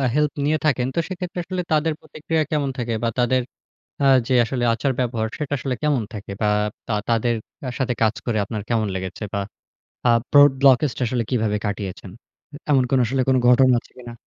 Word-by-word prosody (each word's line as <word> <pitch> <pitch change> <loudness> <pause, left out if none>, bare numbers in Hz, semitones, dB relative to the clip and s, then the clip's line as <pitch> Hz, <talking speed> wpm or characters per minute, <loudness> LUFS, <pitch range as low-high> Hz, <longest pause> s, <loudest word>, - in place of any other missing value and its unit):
Help 150 0 +2
নিয়ে 155 +2 +2
থাকেন। 130 -4 +2
তো - - -2
সেক্ষেত্রে 180 -1 -5
আসলে 180 +1 -3
তাদের 155 +1 +2
প্রতিক্রিয়া 155 +1 -2
কেমন 145 -3 0
থাকে? 120 -2 -2
বা 115 - +1
তাদের 125 +1 +2 0.6
আ - - +4 0.2
যে 130 - +1
আসলে 125 +1 -3
আচার-ব্যবহার 120 -3 -1
সেটা 145 -2 -3
আসলে 130 -1 -2
কেমন 145 -6 +1
থাকে? 105 -2 -7
বা 105 - +2 0.4
তা 115 - -1 0.2
তাদের 115 +1 +2 0.3
আ - - -1
সাথে 125 -2 0
কাজ 110 -1 +3
করে 115 -3 0
আপনার 110 -1 -5
কেমন 110 -3 +1
লেগেছে? 95 +2 -5
বা 100 - 0 0.7
আ - - +6 0.2
প্রড 145 0 +8
ব্লকেজটা 135 0 +4
আসলে 120 +1 -1
কিভাবে 110 -4 +1
কাটিয়েছেন? 100 -2 -5 0.6
এমন 135 -3 +4
কোন 135 - +3
আসলে 130 +3 0
কোন 130 - +4
ঘটনা 125 0 +6
আছে - - -22
কিনা? 120 -2 -10
125 Hz, 185 wpm, -22 LUFS, 115-145 Hz, 0.7 s, প্রড